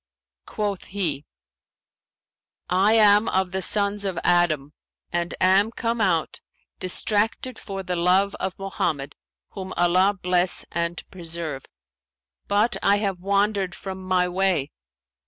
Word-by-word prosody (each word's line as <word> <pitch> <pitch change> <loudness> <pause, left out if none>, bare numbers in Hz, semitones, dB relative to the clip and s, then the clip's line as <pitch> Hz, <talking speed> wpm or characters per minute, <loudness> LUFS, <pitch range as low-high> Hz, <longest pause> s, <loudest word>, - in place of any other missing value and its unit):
Quoth 205 -3 -3
he, 165 -7 -3 1.5
'I 195 +4 +4
am 210 -1 +5
of 190 -1 0
the 190 +1 -2
sons 200 +1 +1
of 190 -4 -2
Adam 155 -5 +2 0.4
and 175 0 -2
am 190 +3 +4
come 230 0 -2
out, 170 -6 0 0.4
distracted 215 +6 0
for 195 -1 -6
the 180 -1 -3
love 185 +3 +2
of 190 - -3
Mohammed 155 -7 -3 0.4
(whom 190 -2 -7
Allah 185 +3 +3
bless 180 0 +1
and 170 0 -2
preserve!); 165 -5 -5 0.8
but 205 +1 +2
I 200 - +4
have 200 -3 -2
wandered 200 -1 0
from 190 -1 -7
my 185 -1 +1
way.' 180 -6 0
190 Hz, 120 wpm, -24 LUFS, 175-200 Hz, 1.5 s, am